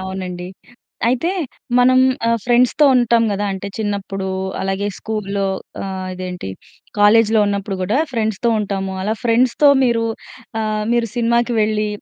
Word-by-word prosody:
అవునండి. 185 Hz, -1 st, -5 dB, 0.6 s
అయితే 260 Hz, +8 st, +1 dB, 0.5 s
మనం 255 Hz, +1 st, +5 dB, 0.3 s
ఆహ్, 230 Hz, -, +2 dB
ఫ్రెండ్స్‌తో 250 Hz, +4 st, +3 dB
ఉంటాం 235 Hz, -1 st, +3 dB
గదా. 205 Hz, +1 st, -1 dB
అంటే 190 Hz, +1 st, -6 dB
చిన్నప్పుడు, 200 Hz, -2 st, -3 dB, 0.3 s
అలాగే 195 Hz, +1 st, -1 dB
స్కూల్‍లో, 200 Hz, -2 st, -3 dB, 0.4 s
ఆహ్ 190 Hz, -1 st, -5 dB
,ఇదేంటి 180 Hz, -, -6 dB, 0.5 s
కాలేజ్‌లో 220 Hz, +1 st, +5 dB
ఉన్నప్పుడు 200 Hz, -1 st, -2 dB
గూడా, 205 Hz, +8 st, +1 dB
ఫ్రెండ్స్‌తో 220 Hz, -1 st, 0 dB
ఉంటాము. 195 Hz, -2 st, -3 dB
అలా 215 Hz, +3 st, 0 dB
ఫ్రెండ్స్‌తో 245 Hz, +5 st, +3 dB, 0.2 s
మీరు 235 Hz, -2 st, +1 dB, 0.6 s
ఆహ్, 215 Hz, -1 st, -1 dB
మీరు 235 Hz, -1 st, +1 dB
సినిమాకి 235 Hz, 0 st, +1 dB
వెళ్ళి, 215 Hz, 0 st, +1 dB
215 Hz, 125 wpm, -19 LUFS, 195-235 Hz, 0.6 s, మనం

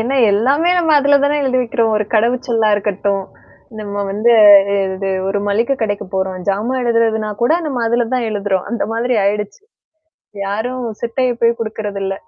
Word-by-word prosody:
ஏன்னா, 250 Hz, +5 st, -1 dB, 0.2 s
எல்லாமே 275 Hz, -, +2 dB
நம்ம 325 Hz, -2 st, +1 dB
அதுல 285 Hz, 0 st, +4 dB
தானே 290 Hz, +1 st, +1 dB
எழுதி 255 Hz, -1 st, 0 dB
வைக்கிறோம். 230 Hz, -1 st, 0 dB
ஒரு 210 Hz, -, 0 dB
கடவுச்சொல்லா 235 Hz, 0 st, +1 dB
இருக்கட்டும். 200 Hz, -1 st, -2 dB, 0.6 s
நம்ம 205 Hz, -1 st, -4 dB
வந்து 215 Hz, +4 st, +2 dB, 0.6 s
இது 195 Hz, +1 st, -4 dB, 0.2 s
ஒரு 205 Hz, -, -1 dB
மளிகை 230 Hz, +6 st, +1 dB
கடைக்கு 205 Hz, -3 st, -2 dB
போறோம். 190 Hz, -1 st, -2 dB
ஜாமா 210 Hz, +6 st, -1 dB
எழுதுறதுனா 225 Hz, -2 st, 0 dB
கூட 240 Hz, -, +3 dB
நம்ம 270 Hz, -5 st, -3 dB
அதுல 235 Hz, +1 st, +1 dB
தான் 245 Hz, -3 st, -1 dB
எழுதுறோம். 200 Hz, -3 st, -2 dB
அந்த 235 Hz, -, -2 dB
மாதிரி 245 Hz, +2 st, -1 dB
ஆயிடுச்சு. 205 Hz, 0 st, -2 dB, 0.9 s
யாரும் 245 Hz, +5 st, -3 dB, 0.2 s
சிட்டைய 245 Hz, +2 st, -1 dB
போய் 235 Hz, 0 st, +2 dB
குடுக்கறதில்ல. 205 Hz, -3 st, -4 dB
225 Hz, 150 wpm, -16 LUFS, 205-245 Hz, 0.9 s, அதுல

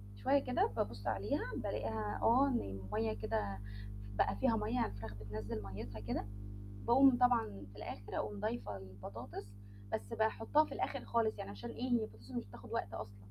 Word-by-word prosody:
شوية 280 Hz, -, +4 dB
كده 370 Hz, -, +2 dB
بابص 105 Hz, -, -1 dB
عليها 100 Hz, -1 st, +1 dB
بالاقيها 110 Hz, -1 st, -1 dB
آه 260 Hz, +5 st, +6 dB
إن 250 Hz, -3 st, +2 dB
المَيَّة 100 Hz, +3 st, -1 dB
كده 105 Hz, -2 st, -1 dB, 0.6 s
بقى -, -, +3 dB
فيها 245 Hz, -4 st, +3 dB
مَيَّة 215 Hz, +3 st, 0 dB
يعني 245 Hz, -, +3 dB
الفراخ 105 Hz, +1 st, -6 dB
بتنزِّل 105 Hz, +1 st, -4 dB
مَيِّتها 100 Hz, +2 st, -6 dB
كده، 105 Hz, -1 st, -2 dB, 0.6 s
باقوم 265 Hz, +1 st, +8 dB
طبعًا 110 Hz, -, +3 dB
في 100 Hz, -, -14 dB
الآخر 105 Hz, 0 st, -5 dB
أقوم 105 Hz, -1 st, -2 dB
ضايفة 105 Hz, -4 st, -2 dB
البطاطس، 100 Hz, +3 st, -7 dB, 0.5 s
بس 100 Hz, -2 st, -2 dB
باحطها 225 Hz, +7 st, +4 dB
في -, -, -12 dB
الآخر -, -, -2 dB
خالص 225 Hz, -2 st, +2 dB
يعني 100 Hz, -, -5 dB
عشان 100 Hz, 0 st, -6 dB
إيه 255 Hz, +1 st, -3 dB
هي 235 Hz, -2 st, +5 dB
البطاطس 105 Hz, -, -9 dB
مش 120 Hz, -, -1 dB
بتاخد -, -, -11 dB
وقت 100 Hz, -, -1 dB
أصلًا. 100 Hz, -2 st, -6 dB
110 Hz, 170 wpm, -37 LUFS, -, 0.6 s, باقوم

